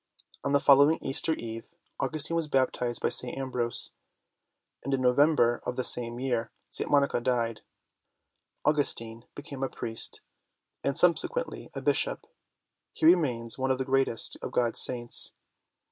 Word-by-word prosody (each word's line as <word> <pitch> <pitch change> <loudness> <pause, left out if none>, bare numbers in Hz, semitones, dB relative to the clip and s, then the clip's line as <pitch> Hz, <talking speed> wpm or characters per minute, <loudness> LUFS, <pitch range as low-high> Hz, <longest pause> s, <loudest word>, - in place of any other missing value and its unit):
On 140 - -2
the 140 - +3
following 145 +3 +5
Easter 150 +4 0
Eve, 115 -3 -8 0.3
Au - - 0
gustine 155 +1 -3
was 165 -2 -1
baptized 125 -3 -1
by - - +2
St. 125 +1 0
Ambrose, 125 -3 -1 0.9
and 140 - -5
in 130 - -4
November 125 -1 +2
of 125 - -4
the 130 - -2
same 120 -1 +4
year 125 -3 -2 0.2
St. - - -5
Monica 140 -4 +1
died. 115 -3 -2 1.0
Augustine 115 -6 -1
became 145 -2 -9
a 135 - -2
priest 115 -1 -4 0.6
and 140 - -1
subsequently 475 - +1
a - - -6
Bishop: - - -1 0.7
he - - -3
remains 130 -9 +2
one 130 0 -1
of 130 - +1
the 130 - -3
greatest 135 -3 0
of - - -6
God's 120 -1 +3
saints. 120 -1 +4
130 Hz, 145 wpm, -27 LUFS, 120-145 Hz, 1.0 s, following